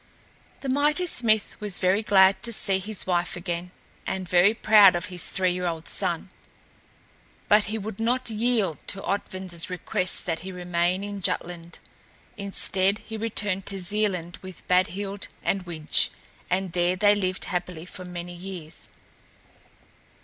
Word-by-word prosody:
The 275 - -6
mighty 295 +6 +1
smith 220 - +2
was 205 -3 -1
very 185 +3 +2
glad 190 -2 +4
to 235 - 0
see 195 -3 +2
his 205 +1 -3
wife 175 -1 0
again 175 0 -5 0.4
and 190 -1 -3
very 180 +5 +4
proud 210 -4 +6
of 175 +2 -2
his 175 - +3
three 185 -1 0
year 180 0 -3
old 165 -1 -5
son; - - -2 1.2
but 210 0 +4
he 220 +1 -3
would 215 -1 -7
not 245 +3 0
yield 220 -6 0
to 195 - -3
Otvin's 185 -3 -2
request 180 0 0
that 165 -2 -2
he 190 +3 -8
remain 180 +1 -1
in 205 -1 -6
Jutland. 170 -1 -4 0.6
Instead 195 0 +3
he 220 - -7
returned 205 -3 0
to 195 -1 +3
Zealand 185 -3 -1
with 185 -1 -12
Badhild 195 +2 0 0.2
and 190 -2 -1
Widge, 155 -3 +2 0.4
and 185 0 -1
there 175 +1 +1
they 205 +2 +4
lived 185 -3 -2
happily 180 -2 -4
for 185 0 -9
many 175 -1 -7
years. 175 -3 -9
190 Hz, 150 wpm, -25 LUFS, 180-205 Hz, 1.2 s, proud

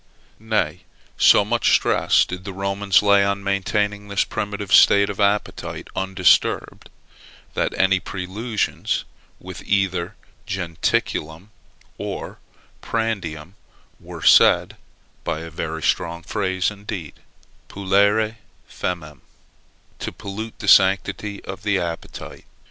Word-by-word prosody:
Nay, 105 -7 -1 0.4
so - - +5
much - - +2
stress - - +3
did 90 +1 -7
the 100 0 -6
Romans 100 +1 +1
lay 100 -1 +5
on 100 0 -1
maintaining 105 +1 -1
this 100 -1 +1
primitive 100 -1 -4
state 100 0 +6
of 100 - -9
the 105 - +2
appetite 100 +1 -2
undisturbed, 95 -2 +1 0.6
that - - -1
any 95 0 +3
prelusions 100 +5 -3 0.4
with - - -9
either 95 -4 0 0.3
jentaculum 85 -1 -2 0.5
or - - -6 0.4
prandium 95 -8 -3 0.5
were - - -10
said, - - +5 0.5
by 80 - -3
a 80 0 -8
very 80 -1 -5
strong 85 0 -1
phrase 95 0 -1
indeed, 100 -6 -7 0.5
polluere 100 +3 +1 0.3
famem, 75 -5 -5 0.8
to - - -4
pollute 105 +3 -7
the 105 - -7
sanctity 100 +2 +3
of 95 0 -7
the 100 -1 +1
appetite. 85 -2 -6
100 Hz, 110 wpm, -22 LUFS, 90-105 Hz, 0.8 s, state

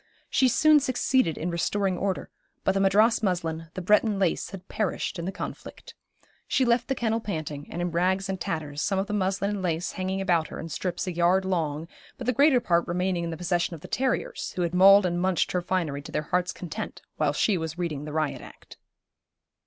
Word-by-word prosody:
She 260 - +4
soon 305 +5 +5
succeeded 255 - +1
in 175 +3 -2
restoring 190 +3 0
order, 190 +1 -2 0.3
but - - +3
the 195 - 0
Madras 210 +4 +4
muslin, 165 -5 -2
the 185 - -4
Breton 210 +2 +3
lace 190 -4 0
had 195 -2 -10
perished 200 -3 -2
in 170 - -4
the 190 - -2
conflict. - - -8 0.5
She 260 - +2
left 240 0 +2
the 270 - 0
kennel 225 -2 0
panting, 155 -9 -5
and 175 +1 -3
in 175 - -2
rags 185 +3 +1
and 190 -1 -4
tatters, 150 -2 -3
some 195 +3 0
of 195 - 0
the 210 - -5
muslin 200 0 0
and 205 -2 -3
lace 170 -1 -1
hanging 190 +1 -3
about 175 -4 +1
her - - -8
in 165 - -6
strips 175 +2 -3
a 185 - -3
yard 175 +3 +3
long, 160 -4 -1 0.3
but 250 - -6
the 250 - +2
greater 280 +1 +5
part 170 -6 +1
remaining 180 0 -1
in - - -3
the 165 - -5
possession 175 0 -1
of 155 - -13
the - - -9
terriers, 260 -1 -2
who 180 - 0
had 170 0 -2
mauled 195 +2 +7
and 175 -1 0
munched 185 -1 +1
her 180 - 0
finery 170 -6 -1
to - - -10
their 150 - -1
hearts' 180 +3 0
content, 175 - -7
while - - +2
she 210 - +2
was 160 -1 -4
reading 155 -5 -3
the 150 - -6
Riot 155 -1 -1
Act. - - -14
185 Hz, 215 wpm, -26 LUFS, 170-200 Hz, 0.5 s, mauled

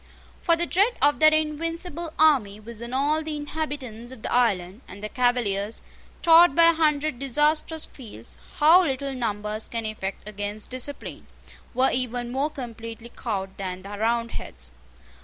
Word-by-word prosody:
For 335 - +4
the 340 +1 -1
dread 400 +8 +3
of 290 +1 +3
that 310 0 +7
invincible 330 +2 -2
army 250 -10 +4
was 225 +1 -9
on 235 0 -6
all 290 +4 +1
the 310 -1 -4
inhabitants 290 -6 -5
of 255 -4 -12
the - - -2
island; 200 -4 +1
and 200 +3 -11
the 215 - -3
Cavaliers, 230 -5 0 0.4
taught 335 -2 +7
by 335 0 +7
a - - -3
hundred 305 -4 +1
disastrous 300 +4 +1
fields 210 - -10 0.2
how 320 +5 +7
little 275 -4 -1
numbers 215 -3 -3
can 230 -1 -3
effect 210 -2 -5
against 205 +1 -5
discipline, 255 +3 -5 0.5
were 260 +1 +4
even 245 -1 -1
more 275 +4 0
completely 230 -4 -8
cowed 195 -5 -3
than 185 -1 -5
the 200 - -9
Roundheads. 230 - -2
250 Hz, 155 wpm, -25 LUFS, 215-305 Hz, 0.5 s, that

